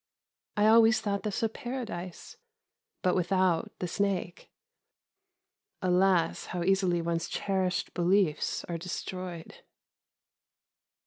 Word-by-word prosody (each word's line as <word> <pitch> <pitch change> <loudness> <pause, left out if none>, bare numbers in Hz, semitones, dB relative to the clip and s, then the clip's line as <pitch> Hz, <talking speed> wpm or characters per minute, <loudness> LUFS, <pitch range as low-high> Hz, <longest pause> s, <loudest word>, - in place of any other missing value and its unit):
I 210 - +4
always 225 0 +6
thought 200 -1 -2
this 210 +2 -3
a - - +4
paradise, 225 -8 -6 0.7
but 180 - +3
without 185 -1 +1
the 180 - -3
snake. 185 -1 -2 1.3
Alas! 180 -2 +2
how 180 -1 -3
easily 185 -2 +2
one's 165 0 -1
cherished 190 -2 -1
beliefs 180 -2 +1
are 170 -1 -4
destroyed. 180 -1 -6
185 Hz, 100 wpm, -29 LUFS, 175-200 Hz, 1.3 s, always